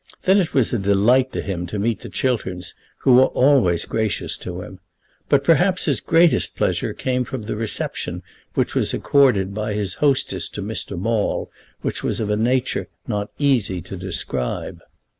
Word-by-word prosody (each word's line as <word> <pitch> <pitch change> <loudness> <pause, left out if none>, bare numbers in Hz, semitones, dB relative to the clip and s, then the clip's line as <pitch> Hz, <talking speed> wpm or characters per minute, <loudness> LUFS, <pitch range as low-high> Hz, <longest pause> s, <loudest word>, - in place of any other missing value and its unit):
Then 190 +2 +5
it 175 - -1
was 130 -4 +2
a 120 - +1
delight 105 +7 +3
to - - -3
him 90 -3 -4
to 105 - -5
meet 110 +2 0
the - - -9
Chilterns, 95 -9 -2 0.3
who 130 - +4
were 130 +1 +7
always 125 - +3
gracious 110 -4 -1
to 90 0 -6
him. 95 - -11 0.5
But 140 -1 +4
perhaps 180 +4 +3
his - - +1
greatest 165 0 +3
pleasure - - 0
came 125 -1 -1
from 125 -1 -6
the 105 - -4
reception 110 0 -2 0.3
which - - 0
was - - +1
accorded 115 -9 +3
by 105 0 -3
his 100 -3 -1
hostess 135 -10 +1
to 100 - -4
Mr. 105 -2 -3
Maule, 110 +3 -1 0.3
which - - -2
was - - -1
of 105 -2 -1
a - - +2
nature 125 +4 0 0.2
not 105 -3 -2
easy 125 -11 +1
to 90 +2 -8
describe. 90 -9 -3
110 Hz, 175 wpm, -21 LUFS, 95-130 Hz, 0.5 s, were